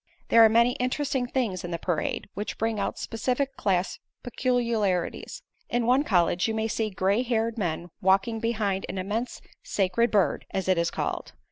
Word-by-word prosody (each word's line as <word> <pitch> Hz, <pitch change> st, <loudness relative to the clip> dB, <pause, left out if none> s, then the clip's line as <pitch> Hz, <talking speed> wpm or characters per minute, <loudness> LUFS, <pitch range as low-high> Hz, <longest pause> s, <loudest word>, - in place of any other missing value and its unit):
There 230 Hz, 0 st, +7 dB
are 220 Hz, -, +8 dB
many 235 Hz, +2 st, +4 dB
interesting 260 Hz, 0 st, -1 dB
things 235 Hz, -8 st, -1 dB
in 175 Hz, -, -5 dB
the 170 Hz, -, -2 dB
parade, 170 Hz, -1 st, -2 dB
which 205 Hz, -, -5 dB
bring 225 Hz, -1 st, -1 dB
out 200 Hz, -, -2 dB
specific 255 Hz, +4 st, -2 dB
class 190 Hz, -5 st, 0 dB, 0.2 s
peculiarities. 235 Hz, -7 st, -1 dB, 0.3 s
In 240 Hz, -1 st, 0 dB
one 255 Hz, +4 st, +4 dB
college 180 Hz, -, +2 dB
you 220 Hz, -, -1 dB
may 220 Hz, 0 st, 0 dB
see 220 Hz, -1 st, -1 dB
gray 195 Hz, +3 st, +1 dB
haired 230 Hz, -2 st, 0 dB
men 175 Hz, -4 st, -3 dB
walking 195 Hz, +4 st, +2 dB
behind 215 Hz, -4 st, -1 dB
an -, -, -4 dB
immense 210 Hz, +6 st, -3 dB, 0.2 s
Sacred 205 Hz, +5 st, +1 dB
Bird, 200 Hz, -3 st, +1 dB
as 190 Hz, -1 st, -3 dB
it 185 Hz, -2 st, +3 dB
is 170 Hz, -, +1 dB
called. -, -, -4 dB
220 Hz, 170 wpm, -26 LUFS, 190-235 Hz, 0.3 s, are